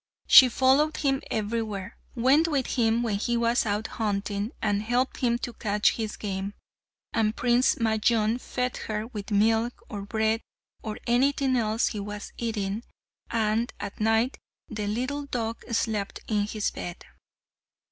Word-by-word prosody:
She 255 - +9
followed 270 +5 +3
him 270 -2 +1
everywhere, 215 -3 -3 0.2
went 270 +7 +4
with 280 -5 0
him 230 -1 +2
when 215 -4 0
he 240 +2 0
was 235 0 +2
out 210 +1 -1
hunting, 205 0 -2
and 205 -2 0
helped 245 +4 0
him 235 -2 +1
to 240 0 -5
catch 210 -2 +2
his 220 -2 -4
game, 195 -1 -4 0.6
and 220 0 +1
Prince 245 +1 +3
Majnun 220 +1 +1
fed 250 0 -2
her 215 0 -2
with 210 -4 -7
milk, 225 +3 +2
or 205 -2 -5
bread, 220 +2 0 0.4
or 215 -1 -5
anything 265 +2 +2
else 225 -1 +1
he 210 - -5
was 205 +1 -6
eating, 215 -2 -2 0.5
and 225 +1 0
at - - -6
night 225 +4 +2 0.3
the 210 -2 -4
little 255 +7 -2
dog 230 -3 -3
slept 215 -3 -1
in 210 -2 +1
his 215 -1 -1
bed. 175 0 -7
225 Hz, 145 wpm, -27 LUFS, 210-240 Hz, 0.6 s, She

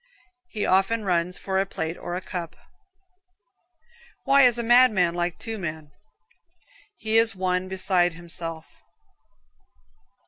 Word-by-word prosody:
He 215 - -3
often 195 +4 +1
runs 180 -1 0
for 190 -1 -2
a 195 - 0
plate 160 -2 -4
or 175 - -6
a 180 - -4
cup. 175 -3 -6 1.7
Why 275 0 +4
is 245 -3 +5
a 235 - -2
madman 225 -8 +4
like 175 0 -2
two 225 -2 -6
men? 155 -4 -6 1.1
He 220 0 0
is 225 -2 +3
one 185 0 -1
beside 185 -2 +1
himself. 165 -1 -6
185 Hz, 125 wpm, -24 LUFS, 175-220 Hz, 1.7 s, is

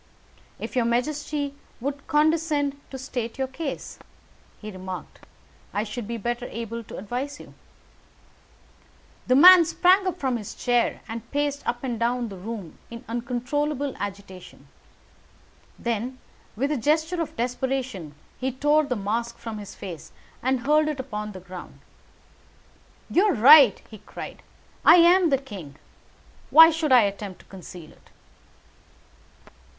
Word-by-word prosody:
"If - - -7
your 245 -2 +2
majesty 285 +4 -1 0.3
would 280 +3 -5
condescend 300 -2 +1
to 265 - -7
state 250 -3 -5
your 265 - 0
case," 275 +2 -6 0.6
he 215 0 -8
remarked, 185 -1 -9 0.5
"I 205 - +1
should 215 0 -6
be 235 0 -4
better 240 +3 -3
able 230 0 -6
to - - -9
advise 255 +8 -5
you." - - -13 1.7
The 255 - +4
man 355 +4 +9
sprung 370 +3 +3
from 265 -8 -1
his 210 -3 -8
chair, 245 -1 0
and 230 0 -7
paced 290 0 -1
up 240 +1 -2
and 240 -4 -3
down 240 0 0
the 195 - -8
room 195 -3 -8
in 235 0 -10
uncontrollable 260 +4 -2
agitation. 195 -2 -8 1.1
Then, 235 +2 -3 0.4
with 275 +7 -1
a 300 - 0
gesture 315 +7 +1
of 325 - -5
desperation, 245 - -3 0.2
he 265 +1 -1
tore 295 +4 +2
the 255 -3 -2
mask 230 +3 -3
from 225 -2 -7
his 205 - -9
face 175 -6 -9 0.3
and 260 0 0
hurled 300 +4 +3
it 300 -3 -3
upon 210 -5 -5
the 185 - -8
ground. 180 0 -11 1.3
"You 370 +5 +3
are 415 - +3
right," 265 0 +8
he 215 - -12
cried, - - -9 0.4
"I - - +9
am 350 0 +6
the 275 - +3
king. 200 - -10 0.7
Why 325 +1 +9
should 315 -3 -1
I 250 -2 +8
attempt 200 -1 -4
to - - -24
conceal 180 -3 -11
it?" - - -23
250 Hz, 140 wpm, -25 LUFS, 215-290 Hz, 1.7 s, man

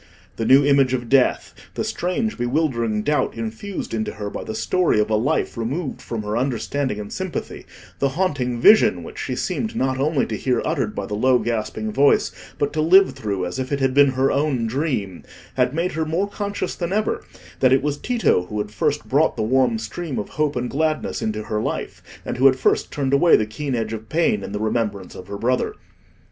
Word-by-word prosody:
The 115 - -1
new 135 +2 +6
image 135 -2 +4
of 120 -2 -5
death; 135 -2 +2 0.2
the - - -1
strange 215 +5 -2
bewildering 120 -5 0
doubt 150 +4 0
infused 115 - -5
into 110 -1 -2
her 105 -1 -5
by - - -5
the 110 - -6
story 180 -3 +1
of 105 +1 +1
a - - +4
life 125 +9 0
removed 135 +6 -3
from 115 -2 -5
her 105 +1 -3
understanding 130 -1 -1
and 105 -1 -7
sympathy; - - -5 0.3
the 140 - +2
haunting 135 -10 0
vision, 215 - +5
which - - -9
she - - -3
seemed 220 -1 -2
not 130 0 0
only 145 0 +1
to - - -4
hear 125 -3 0
uttered 135 -9 -1
by 100 - -3
the 105 - -6
low 125 +4 +3
gasping 110 -1 -2
voice, 140 +4 +3 0.3
but 145 - -1
to 155 - 0
live 190 +5 +6
through, 100 -4 -3
as 90 +8 -4
if 130 +1 -4
it 140 - 0
had 130 -1 +1
been 140 -1 +5
her 130 +1 +2
own 140 -5 0
dream, 115 - -2 0.3
had 125 -1 +1
made 170 +3 0
her 160 - -1
more 165 +6 -1
conscious 205 -2 -3
than 170 0 -4
ever 215 +2 0 0.4
that 130 - +4
it 135 +1 +4
was 145 -1 -1
Tito 225 - +1
who 105 - -5
had 105 0 -3
first 150 +5 -1
brought 145 +4 +2
the 110 - 0
warm 130 - +2
stream 175 - -5
of 105 - -4
hope 150 -1 -1
and 125 0 -1
gladness 155 +3 -1
into 110 0 -2
her 105 0 -2
life, - - -4 0.2
and - - -3
who 135 +2 +6
had 130 - +5
first 130 - +1
turned 140 -2 -1
away 165 +5 +6
the 110 - +2
keen 130 +5 -4
edge 115 -1 -2
of 110 0 -7
pain 170 +7 +1
in - - -6
the 105 - -3
remembrance 105 -3 -2
of 90 - -10
her 100 0 -5
brother. 125 +4 0
130 Hz, 215 wpm, -22 LUFS, 110-155 Hz, 0.4 s, new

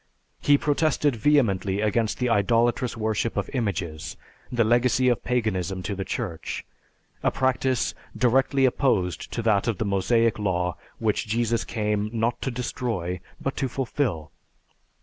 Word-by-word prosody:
He 145 0 +4
protested 145 -2 +1
vehemently 105 -7 +2
against 110 +1 +1
the 125 - 0
idolatrous 115 +2 +2
worship 110 0 -1
of 100 - -2
images, 85 - -3 0.3
the 120 -2 +3
legacy 120 +2 +3
of 120 - 0
Paganism 95 -7 -1
to 100 +3 -2
the 95 - -3
Church, 95 -7 -4 0.6
a - - +3
practice 130 -1 0 0.2
directly 135 +2 +3
opposed 120 -9 +1
to 115 - -3
that 105 -1 +2
of 115 -5 0
the 110 - -1
Mosaic 110 +4 +2
law 90 -3 0 0.2
which 110 -1 0
Jesus 115 +1 +1
came, 105 -1 -1
not 115 +1 -1
to - - -1
destroy, 115 -7 -3 0.2
but 135 - -3
to 135 - 0
fulfill. 115 - -2
115 Hz, 140 wpm, -25 LUFS, 100-125 Hz, 0.6 s, He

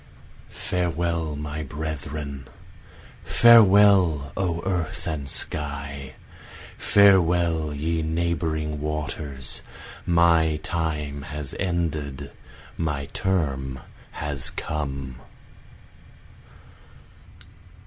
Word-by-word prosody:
Farewell 85 -3 -2
my 75 +1 -4
brethren, 75 -2 -5 0.8
Farewell 100 -10 +6
O 85 -3 -1
earth 90 -4 -2
and 70 -3 -3
sky, 70 -3 -4 0.6
farewell 85 -5 +4
ye 80 +3 -1
neighboring 80 -2 -1
waters, 75 -3 -4 0.5
My 85 -2 +4
time 75 -4 -2
has 75 -1 -5
ended, 75 -6 -2 0.5
my 75 -4 -2
term 70 -9 -1 0.3
has 75 -2 -3
come. 70 -4 -4
75 Hz, 65 wpm, -25 LUFS, 70-85 Hz, 0.8 s, Farewell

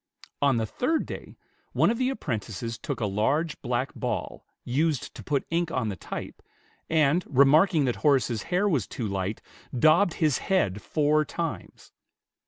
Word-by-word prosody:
On 140 -4 +3
the 110 - 0
third 310 - -1
day, - - -8 0.4
one - - +3
of 235 - -3
the 255 0 +2
apprentices 115 - -4
took - - -4
a 110 - 0
large 135 +11 0
black 125 +2 -2
ball, - - -4 0.2
used 145 +2 0
to - - -10
put 140 -2 -1
ink 170 0 +1
on 125 -8 -1
the 100 - -3
type, - - -7 0.5
and 160 +2 +3
remarking 150 +4 +5
that 125 - -1
Horace's 130 -7 +2
hair 190 +4 +2
was 140 - +1
too 115 - -5
light, 100 +1 -3 0.3
daubed 160 +7 +4
his 155 -5 +1
head 105 - 0
four 155 0 +2
times. 165 +1 -6
145 Hz, 160 wpm, -27 LUFS, 115-165 Hz, 0.5 s, remarking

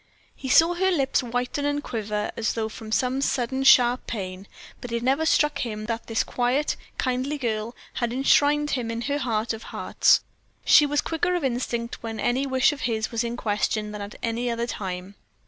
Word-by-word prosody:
He 265 - -6
saw 325 +6 +6
her 380 +2 +1
lips 280 -8 +1
whiten 245 +3 -2
and 290 0 -1
quiver 210 -2 -3
as 220 -1 -1
though 220 -1 -2
from 220 0 -9
some 255 +4 +1
sudden, 265 0 0
sharp 250 -2 +5
pain, 190 -3 -5 0.3
but 245 - -7
it 235 0 -2
never 275 +5 +2
struck 295 -2 +2
him 215 -3 -4
that 230 0 -4
this 225 -1 +1
quiet, 255 +4 0 0.2
kindly 255 +3 -1
girl 230 -3 -3 0.2
had 240 -1 -1
enshrined 290 +3 +3
him 245 -4 -1
in 230 0 -3
her 285 +3 -1
heart 230 -4 -1
of 225 - -7
hearts. - - +2 0.4
She 295 - +7
was 290 0 +1
quicker 345 +2 -1
of 350 - -2
instinct 240 -2 -2
when 225 -1 -5
any 255 +3 0
wish 260 +1 +3
of 295 - -9
his 220 -1 -2
was 230 0 0
in 235 0 -3
question 210 -1 -1
than 210 -1 -6
at 200 +1 -7
any 235 +1 -1
other 235 0 -1
time. 190 -4 -5
240 Hz, 195 wpm, -25 LUFS, 225-275 Hz, 0.4 s, She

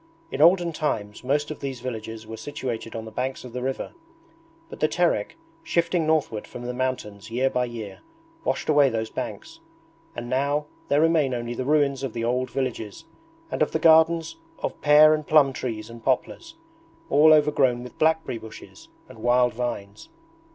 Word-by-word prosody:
In 135 - -2
olden 170 +1 +5
times 110 -10 -3
most 145 +4 0
of 155 - -7
these 135 -3 -5
villages 115 -3 -6
were 110 +1 -7
situated 115 -3 -5
on 115 0 -5
the 110 - -9
banks 130 +3 -3
of 120 - -10
the 125 - -4
river; 130 +1 -3 0.7
but - - -11
the 155 - +3
Terek, 165 -10 0 0.2
shifting 170 -1 0
northward 150 -9 0
from 120 - -9
the 125 0 -4
mountains 120 -5 -3
year 130 +3 0
by 125 0 0
year, 115 -5 -8 0.4
washed - - -2
away 145 -3 +5
those 110 -2 -3
banks, 325 - -6 0.6
and 120 0 -5
now 140 +4 0 0.2
there 145 +1 +3
remain 155 -5 +3
only 120 0 -4
the 125 +1 -4
ruins 140 -2 +2
of 135 -5 -4
the 115 - -3
old 125 +2 0
villages 130 +1 -4 0.5
and - - -3
of 155 - +1
the - - +2
gardens 160 - +4 0.2
of - - -5
pear 150 +1 +7
and 155 -1 -2
plum 145 -3 +5
trees 110 -4 -4
and 115 0 -12
poplars, 330 - -2 0.6
all 150 +2 +6
overgrown 145 -5 +3
with 125 - -12
blackberry 160 -6 +1
bushes 110 -1 -12 0.2
and - - -14
wild 120 +1 +3
vines. 110 -4 -5
130 Hz, 175 wpm, -25 LUFS, 120-155 Hz, 0.7 s, pear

